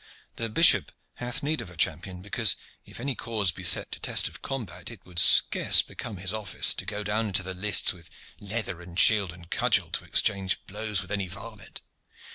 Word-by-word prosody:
The 115 Hz, -1 st, -2 dB
bishop 165 Hz, +10 st, +3 dB, 0.3 s
hath 125 Hz, +1 st, -4 dB
need 155 Hz, +2 st, -1 dB
of -, -, -10 dB
a 90 Hz, -, -14 dB
champion, 90 Hz, +2 st, -3 dB
because, 105 Hz, -1 st, +2 dB, 0.3 s
if -, -, -11 dB
any 135 Hz, +3 st, -3 dB
cause 110 Hz, -6 st, -1 dB
be 90 Hz, -, -11 dB
set 90 Hz, -, +4 dB
to -, -, -6 dB
test -, -, +2 dB
of -, -, -10 dB
combat, 120 Hz, -, -6 dB
it -, -, -13 dB
would 90 Hz, -2 st, -6 dB
scarce -, -, +5 dB
become 105 Hz, -, -9 dB
his 95 Hz, +2 st, -1 dB
office 110 Hz, -3 st, +1 dB
to -, -, -5 dB
go 105 Hz, 0 st, -4 dB
down 105 Hz, +2 st, -1 dB
into 95 Hz, -2 st, 0 dB
the 95 Hz, +1 st, -5 dB
lists 100 Hz, +2 st, +3 dB
with 85 Hz, -2 st, -16 dB, 0.3 s
leather 100 Hz, -4 st, -4 dB
and 85 Hz, +1 st, -5 dB
shield 105 Hz, -5 st, +5 dB
and 85 Hz, -1 st, -16 dB
cudgel -, -, +1 dB
to -, -, -3 dB
exchange 100 Hz, -2 st, 0 dB
blows 105 Hz, -2 st, -3 dB
with 90 Hz, -, -12 dB
any 100 Hz, -2 st, -2 dB
varlet. 110 Hz, +3 st, -9 dB
100 Hz, 200 wpm, -26 LUFS, 90-110 Hz, 0.3 s, scarce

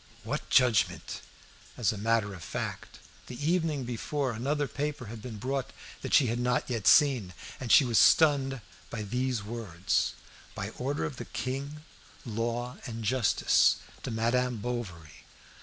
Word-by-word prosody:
What -, -, -4 dB
judgment? 125 Hz, -4 st, +2 dB, 0.6 s
As 115 Hz, -6 st, +2 dB
a -, -, -5 dB
matter 110 Hz, -1 st, +1 dB
of 90 Hz, -3 st, -9 dB
fact, -, -, -5 dB, 0.3 s
the 125 Hz, -, -7 dB
evening 160 Hz, -6 st, 0 dB
before 125 Hz, +3 st, -2 dB
another 140 Hz, +6 st, -1 dB
paper 145 Hz, +2 st, -3 dB
had 115 Hz, -, -8 dB
been 115 Hz, -2 st, -7 dB
brought 135 Hz, +4 st, -2 dB, 0.3 s
that -, -, +1 dB
she 140 Hz, -, +6 dB
had 120 Hz, 0 st, -1 dB
not 125 Hz, 0 st, +1 dB
yet 115 Hz, -6 st, -2 dB
seen, 130 Hz, -, +5 dB, 0.2 s
and 125 Hz, -3 st, -3 dB
she 140 Hz, -, +8 dB
was 115 Hz, -3 st, +3 dB
stunned 140 Hz, -6 st, +4 dB, 0.3 s
by 110 Hz, -2 st, -4 dB
these 125 Hz, +1 st, -1 dB
words 105 Hz, -6 st, -1 dB, 0.4 s
"By -, -, -4 dB
order 140 Hz, +4 st, -2 dB
of 135 Hz, -, -5 dB
the -, -, -6 dB
king, 140 Hz, +3 st, -4 dB, 0.4 s
law, 120 Hz, +2 st, -3 dB
and 115 Hz, -1 st, -6 dB
justice, 120 Hz, 0 st, +3 dB, 0.3 s
to -, -, -5 dB
Madame 120 Hz, +2 st, +1 dB
Bovary." 100 Hz, -9 st, -6 dB
125 Hz, 150 wpm, -29 LUFS, 110-135 Hz, 0.6 s, she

